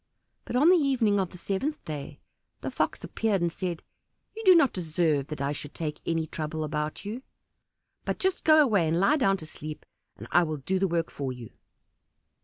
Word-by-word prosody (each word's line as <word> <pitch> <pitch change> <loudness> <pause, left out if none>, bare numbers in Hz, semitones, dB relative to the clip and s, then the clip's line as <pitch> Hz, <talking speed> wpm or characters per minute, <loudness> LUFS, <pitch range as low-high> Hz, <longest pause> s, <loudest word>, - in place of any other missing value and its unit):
But - - -5
on 290 +7 +5
the 365 - +7
evening 250 -9 +2
of 190 -2 0
the 180 - -12
seventh 205 - -3
day 145 -1 -6 0.4
the - - -4
Fox - - -1
appeared 215 -3 0
and 170 -1 0
said, 175 -2 -4 0.5
"You 445 - -6
do 370 -1 +9
not 285 -6 +5
deserve 160 -5 0
that 155 -3 -6
I 140 +1 0
should 145 0 -6
take 150 -2 -4
any 165 -1 0
trouble 155 0 -4
about 150 +3 -3
you; 220 +5 -5 0.8
but - - -2
just 380 -1 0
go 310 -1 +7
away 200 - +2
and 165 +2 +1
lie 290 +11 +4
down 195 -8 +3
to 160 - -9
sleep, 155 -1 -8 0.3
and - - -9
I 175 - +6
will 155 -3 -1
do 185 +7 -1
the 195 - +2
work 165 -2 -1
for 135 -2 -4
you." 120 -3 -9
175 Hz, 205 wpm, -27 LUFS, 155-225 Hz, 0.8 s, do